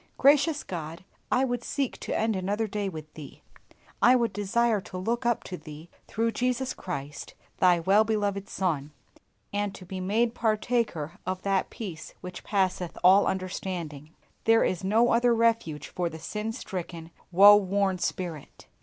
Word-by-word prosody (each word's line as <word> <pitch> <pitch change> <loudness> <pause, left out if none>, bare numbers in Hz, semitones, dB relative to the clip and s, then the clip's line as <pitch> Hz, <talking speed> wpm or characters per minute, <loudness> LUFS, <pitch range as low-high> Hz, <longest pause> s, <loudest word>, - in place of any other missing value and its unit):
Gracious 290 +2 +4
God, 165 -1 -6 0.3
I 260 - +3
would 245 -2 -2
seek 275 -3 -2
to - - -3
end 220 -1 +1
another 200 +4 -1
day 205 -1 -3
with 155 -3 -9
Thee; 150 -3 -11 0.6
I 250 +2 +7
would 235 -4 +1
desire 210 +2 +1
to 185 0 -8
look 235 +6 -1
up 240 - +1
to 180 - -6
Thee 155 +1 -11 0.2
through 230 +2 0
Jesus 250 +3 -1
Christ, 145 -5 -7 0.2
Thy 180 -2 +5
well 195 +6 +4
beloved 205 -3 -1
Son, 150 -6 -2 0.6
and 205 -1 -1
to 185 - -11
be 185 +1 -6
made 220 +5 +1
partaker 215 -8 -1
of 185 0 -4
that 195 -1 0
peace 175 -8 -8
which 180 -1 -8
passeth 185 -3 -1
all 190 +3 +6
understanding. 180 -5 -4 0.4
There 225 0 +5
is 185 0 -1
no 225 +5 +3
other 235 0 +4
refuge 225 -11 +1
for 175 -1 -2
the 160 - -8
sin 210 +7 -4
stricken, 175 -7 -6 0.2
woe 200 +3 +9
worn 195 -1 +1
spirit. 170 -5 -5
195 Hz, 160 wpm, -27 LUFS, 175-225 Hz, 0.6 s, woe